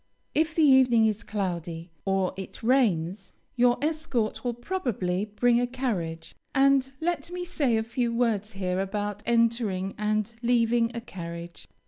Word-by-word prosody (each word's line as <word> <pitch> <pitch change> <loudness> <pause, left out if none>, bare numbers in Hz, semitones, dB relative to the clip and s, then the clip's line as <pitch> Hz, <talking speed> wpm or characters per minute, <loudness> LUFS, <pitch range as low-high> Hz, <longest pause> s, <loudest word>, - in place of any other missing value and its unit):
If 315 0 +1
the 320 - +4
evening 260 -5 +6
is 215 0 0
cloudy, 175 -5 -4
or 195 -1 +1
it 190 +3 -8
rains, 195 -7 +1 0.2
your 245 0 +4
escort 300 -8 -1
will 245 -2 -1
probably 230 - -2
bring 235 +3 +2
a 245 - +1
carriage; 190 -11 -3 0.2
and 270 -1 +4
let 340 0 -1
me 355 0 -4
say 285 -10 +1
a 220 - 0
few 235 +1 -1
words 225 -3 0
here 185 -1 -2
about 205 +1 -3
entering 230 -5 +1
and 215 +1 0
leaving 235 -1 +2
a 235 - -3
carriage. 170 -5 -8
230 Hz, 145 wpm, -27 LUFS, 195-250 Hz, 0.2 s, evening